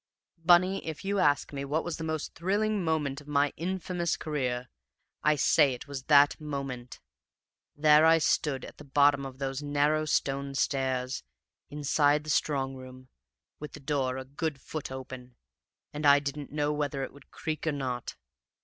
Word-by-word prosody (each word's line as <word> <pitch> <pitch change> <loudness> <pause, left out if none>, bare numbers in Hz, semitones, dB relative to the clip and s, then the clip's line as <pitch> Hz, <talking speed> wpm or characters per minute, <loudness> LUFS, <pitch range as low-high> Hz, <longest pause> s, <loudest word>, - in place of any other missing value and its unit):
"Bunny, 185 +3 +4
if 160 +2 -6
you 200 0 0
ask 145 -4 +2
me 140 0 -4
what 145 +3 -1
was 175 -2 -4
the 160 - -5
most 160 -1 -3
thrilling 205 +3 0
moment 150 -4 -1
of 145 - -18
my 145 -1 +2
infamous 180 -1 -2
career, 125 -5 -2 0.5
I 150 0 +3
say 140 -1 +4
it 120 - -11
was 135 -2 -6
that 145 0 +5
moment. 135 -5 -5 0.8
There 150 +1 +6
I 165 0 +6
stood 150 -4 0
at - - -12
the - - -10
bottom 140 0 +3
of 130 -1 -11
those 135 0 -3
narrow 145 +1 +1
stone 140 -2 -1
stairs, 130 -1 -1 0.5
inside 145 0 +2
the 155 - -3
strong 135 -2 0
room, 130 0 -11 0.5
with 150 - -8
the - - -9
door 135 -3 -1
a 130 - -6
good 145 +2 -4
foot 150 +1 -6
open, 130 -1 -8 0.6
and 150 +1 -5
I 145 -1 +7
didn't 145 0 -4
know 150 0 0
whether 145 -2 -2
it - - -6
would 140 0 -17
creak 155 0 -4
or - - +3
not. 130 -4 -4
145 Hz, 170 wpm, -29 LUFS, 135-155 Hz, 0.8 s, I